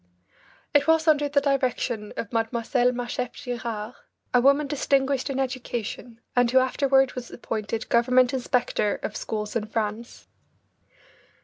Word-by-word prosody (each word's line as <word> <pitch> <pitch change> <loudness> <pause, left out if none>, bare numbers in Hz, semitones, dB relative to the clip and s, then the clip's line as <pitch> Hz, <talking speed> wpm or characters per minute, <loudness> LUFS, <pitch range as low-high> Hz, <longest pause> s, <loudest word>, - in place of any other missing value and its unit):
It 290 0 +4
was 320 0 +3
under 295 -2 +4
the 285 0 +3
direction 255 -6 -1
of 215 - -4
Mlle. 225 - +3
Marchef 245 +1 -1
Girard, 235 -4 -5 0.4
a 250 - +5
woman 280 +3 +4
distinguished 275 -1 0
in 270 -1 -2
education, 245 -3 -4 0.2
and 245 -1 +4
who 260 - +3
afterward 265 0 +3
was 250 -1 -7
appointed 220 -1 -4
government 250 +2 +3
inspector 245 -5 0
of - - -4
schools 210 0 -4
in 215 -2 -1
France. 220 +1 -4
250 Hz, 130 wpm, -25 LUFS, 230-270 Hz, 0.4 s, a